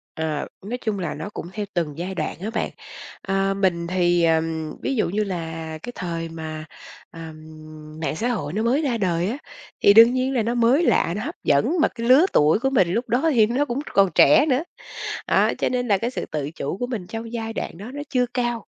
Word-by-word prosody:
Ờ, 155 -2 -2 0.2
nói 245 +4 -3
chung 215 -3 -1
là 175 -4 -3
nó 205 - -6
cũng 205 - -7
theo 210 0 -4
từng 160 -4 -2
giai 185 +3 -4
đoạn - - -3
á 210 +4 -3
bạn. 230 - -2 0.5
Ờ, 195 0 0
mình 180 -4 0
thì, 175 -1 +2
ờm, 160 -1 0
ví - - -1
dụ 215 - +1
như 210 +4 0
là 165 -4 -5
cái 245 - -6
thời 165 -2 -4
mà, 160 -1 -6 0.5
ờm, 165 -1 -9 0.7
mạng 155 - -2
xã 230 +6 -1
hội 195 -12 -2
nó 215 +4 -1
mới 255 +7 +2
ra 250 -6 0
đời 180 -3 0
á 235 - -2 0.4
thì 200 - +7
đương 230 +3 +8
nhiên 255 +1 0
là 240 - +2
nó 230 +2 -1
mới 245 +6 +3
lạ, 170 - +2
nó 210 - -3
hấp - - -5
dẫn 190 - +2
mà - - +4
cái 230 -2 -6
lứa 275 +8 +7
tuổi 150 +5 +4
của 270 +3 0
mình 225 -10 +3
lúc 240 +2 -1
đó 260 +8 +2
thì 225 -5 +5
nó 250 +6 +1
cũng 270 -1 -3
còn 195 -2 +4
trẻ 150 - +6
nữa. 270 0 +2 0.7
Đó, - - +3
cho - - 0
nên 245 -1 -1
là 200 - +3
cái 230 +5 -2
sự - - -4
tự 150 -2 -2
chủ 160 +1 -4
của 245 +3 -3
mình 215 -8 -5
trong 225 +2 -6
giai 225 -1 -4
đoạn 165 - -5
đó 210 +7 -8
nó 290 - -5
chưa 250 -2 +2
cao. 240 -3 -1
205 Hz, 235 wpm, -23 LUFS, 165-240 Hz, 0.7 s, đương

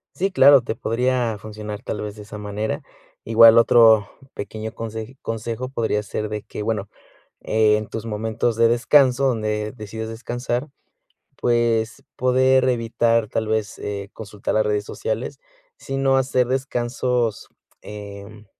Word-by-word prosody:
Sí, 195 +2 0
claro. 140 -6 +7
Te 115 - -4
podría 120 -1 0
funcionar, 105 -1 -7
tal - - -4
vez, 105 -1 -6
de 105 - -10
esa 105 +1 -9
manera. 105 +1 -4 0.4
Igual 115 0 +7
otro 115 -3 +6 0.3
pequeño 110 +2 -6
conseji 110 +2 -6
consejo 115 +2 -4
podría 110 -5 -1
ser, 105 +1 -4
de 105 0 -4
que - - -7
Bueno, 105 -2 -2 0.6
eh, 110 -1 +3
en 105 0 -4
tus 115 0 -6
momentos 110 +1 -1
de 115 0 +5
descanso, 130 +2 +4
donde 110 -3 -1
decidas 110 -1 -7
descansar, 120 +3 -4 0.7
pues, 115 -1 0
poder 130 +1 +3
evitar, 115 -2 +1
tal 110 +1 -2
vez, 110 -1 -1
eh, 100 -1 -5
consultar 105 -2 -5
las 110 0 +3
redes 105 -1 0
sociales. - - -4 0.4
Si 135 - -5
no, 135 0 +3
hacer 130 -1 +1
descansos, 125 -3 -1 0.3
em, 105 +1 -10
115 Hz, 140 wpm, -22 LUFS, 105-125 Hz, 0.7 s, claro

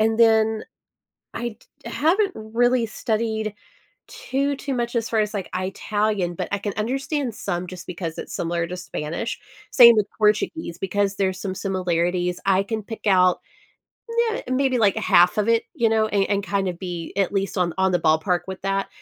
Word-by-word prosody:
and 225 +1 +2
then 220 -1 +4 0.7
I 235 -2 -4
d - - -13
haven't 375 +6 +2
really 235 +2 +1
studied 220 -1 -2 0.5
too, 285 - -2
too 275 0 -4
much 240 -1 -2
as 230 -1 0
far 225 - 0
as 210 -1 +1
like 195 -3 -4
Italian, 195 0 -1
but - - -4
I 200 - +1
can 205 0 -4
understand 265 +2 -2
some, 175 +1 -3
just 180 0 -9
because 170 -2 -5
it's - - -7
similar 170 0 -1
to 180 - -5
Spanish. 170 +3 -4 0.3
Same 235 -2 +9
with 210 -1 +2
Portuguese, 215 - 0
because 200 +1 0
there's 190 -2 -1
some 195 -2 -3
similarities. 180 -2 -1
I 195 0 +4
can 220 +2 -3
pick 225 +2 -9
out 185 -3 +4 0.9
nuh - - -3
maybe, 255 0 +1
like, 205 -4 +3
a - - -1
half 175 +3 +5
of 210 +1 +1
it, 230 0 +3
you 230 - +2
know, 220 -1 +2
and 200 -2 +1
and 200 -1 +1
kind 195 +1 -1
of 175 -1 -4
be 175 -3 -5
at 195 -1 +1
least 195 0 -1
on 175 -2 +1
on 190 0 +2
the 175 - +3
ballpark 160 +3 +2
with 190 0 -6
that. 195 0 0
205 Hz, 185 wpm, -23 LUFS, 185-230 Hz, 0.9 s, Same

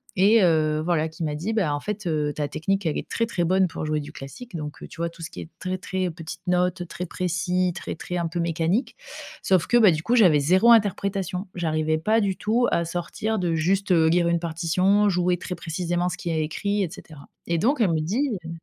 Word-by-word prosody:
et 210 +4 +5
heu, 155 -3 +2
voilà 165 -2 +1
qui 160 +2 -7
m'a 150 -2 -2
dit: 180 +9 -3
«Bah 195 -9 +1
en - - -3
fait, 210 +4 -5
heu, 150 -2 0
ta 150 -1 -1
technique 190 +5 -1
elle 155 - -1
est - - -5
très, 230 - -1
très 200 -6 -1
bonne 185 +2 +3
pour 160 - -5
jouer 155 0 0
du 145 - -8
classique». 180 - -10
Donc 150 -2 -6
heu, - - -8
tu 170 - -14
vois 170 0 -1
tout 170 0 -15
ce 165 - -5
qui - - -8
est - - -9
très 185 0 -3
très 185 0 -2
petites 165 0 -8
notes, 180 0 +1
très 175 +2 -5
précis, 180 +1 -1
très - - -5
très 180 +2 -5
un 170 -1 -1
peu 170 +2 -4
mécanique. 170 - 0 0.5
Sauf 185 -4 +2
que 240 - +4
bah 215 -5 +7
du 155 -1 -1
coup 230 +9 +1
j'avais 180 -11 +6
0 185 +11 +4
interprétation. 200 -3 +1
J'arrivais 155 -2 0
pas 215 +7 +2
du 195 -2 0
tout 230 +5 +1
à 170 - +2
sortir 175 +6 -3
de 175 -4 0
juste, 190 +5 +1
heu, 165 -2 +5
lire 170 +1 +3
une 170 0 +2
partition, 180 +5 +2
jouer 180 -1 +1
très 180 - -5
précisément 175 +1 -2
ce - - -5
qu'il 170 - -4
y - - -1
a - - 0
écrit 200 +7 -1
et 185 - -1
cetera. 155 -5 -12 0.2
Et 170 -1 0
donc 255 - +2
elle 195 -6 +3
me 160 - +1
dit, 240 - 0
heu - - -6
175 Hz, 245 wpm, -24 LUFS, 160-195 Hz, 0.5 s, bah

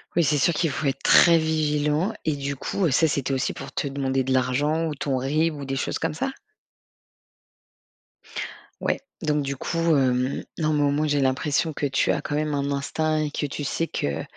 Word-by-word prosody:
Oui, 170 - +4
c'est 150 0 +2
sûr, 170 +4 +2
qu'il 165 -1 +1
faut 140 +1 -2
être 135 - -2
très 170 -1 +7
vigilant. 155 +3 +1
Et 155 -2 +1
du 140 0 -3
coup, 185 +7 -2
heu, - - 0
ça, 160 +5 +4
c'était 140 -2 -1
aussi 130 - 0
pour - - -8
te 145 - -2
demander 135 -1 -1
de 130 - -1
l'argent 145 +6 +1
ou 150 - -3
ton 135 -1 -1
RIB 155 +5 +1
ou 140 -1 -6
des 135 0 -3
choses 135 - -2
comme - - -1
ça? 265 +12 -2 2.5
Ouais, - - 0 0.2
donc, 150 -2 +1
du 140 0 -3
coup, 165 - -3 0.2
hem 130 0 +1
non 155 -2 +1
mais, 150 -1 +2
au 145 - +3
moins, 150 +2 +1
j'ai 145 -1 +1
l'impression 135 +4 +1
que 145 - -2
tu 135 -1 +2
as - - -2
quand 145 - -3
même 150 0 0
un 140 0 -1
instinct 155 +3 -1
et 150 - -1
que 150 - -2
tu 145 +1 -4
sais 165 +4 -1
que 70 0 -2
145 Hz, 215 wpm, -24 LUFS, 135-155 Hz, 2.5 s, très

